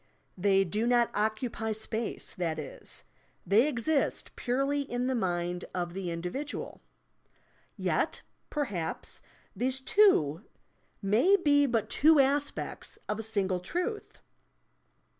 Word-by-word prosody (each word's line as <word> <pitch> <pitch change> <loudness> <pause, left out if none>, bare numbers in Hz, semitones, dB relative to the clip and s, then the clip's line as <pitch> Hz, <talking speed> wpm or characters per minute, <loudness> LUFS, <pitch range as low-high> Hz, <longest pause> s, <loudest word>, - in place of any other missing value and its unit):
They 195 +1 +3
do 210 +6 -1
not 240 -1 +3
occupy 220 +1 -1
space, 220 +1 -4
that 165 -4 -2
is; 150 - -7 0.4
they 215 - +4
exist 290 +2 0
purely 275 +4 0
in 250 -2 -2
the 260 - +1
mind 175 -5 -1
of 175 -1 -2
the 190 -1 -4
individual. 180 - -5 1.0
Yet, - - 0 0.3
perhaps, 205 - -3 0.3
these 260 +1 0
two 265 - +4 0.6
may 230 - +5
be 285 -5 +4
but 230 -4 0
two 310 +1 +5
aspects 280 +1 +1
of 210 +1 -2
a - - -1
single 200 -4 0
truth! 360 - -4
225 Hz, 115 wpm, -30 LUFS, 190-275 Hz, 1.0 s, may